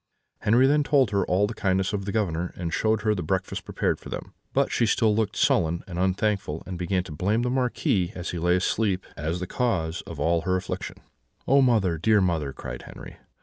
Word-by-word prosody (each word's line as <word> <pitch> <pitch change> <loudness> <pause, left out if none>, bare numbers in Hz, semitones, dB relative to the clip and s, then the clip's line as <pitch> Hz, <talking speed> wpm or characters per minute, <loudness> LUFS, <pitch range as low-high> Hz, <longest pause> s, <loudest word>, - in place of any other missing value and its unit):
"Henri 120 +5 +4
then 145 +2 +4
told 140 -6 +3
her 100 -1 +2
all 95 +3 +3
the 105 - -4
kindness 95 -1 0
of 100 -2 -2
the 100 - -2
Governor, 90 -5 -1
and 85 -2 -4
showed 110 -1 +1
her 110 -1 +3
the 95 - -3
breakfast 95 +3 -2
prepared - - -1
for - - -11
them; - - -6 0.2
but - - +1
she 115 - +2
still 110 -1 +3
looked 110 -2 0
sullen 85 +1 +2
and 90 -2 -6
unthankful, 95 -3 0
and 90 -2 -6
began 90 +1 0
to 90 - -10
blame 100 +9 0
the 125 - 0
Marquis, 120 -8 0
as 90 -1 -4
he 85 - -4
lay 90 +2 +3
asleep, 95 0 0
as 80 +2 -3
the 90 - -3
cause 90 -7 -1
of - - -8
all 85 0 +2
her 90 +3 0
affliction. 95 0 -4 0.5
"'Oh, 140 +1 +5
mother, 105 - +2
dear 110 +4 +4
mother!' 85 -7 0
cried - - -7
Henri. - - -11
95 Hz, 215 wpm, -25 LUFS, 90-110 Hz, 0.5 s, Oh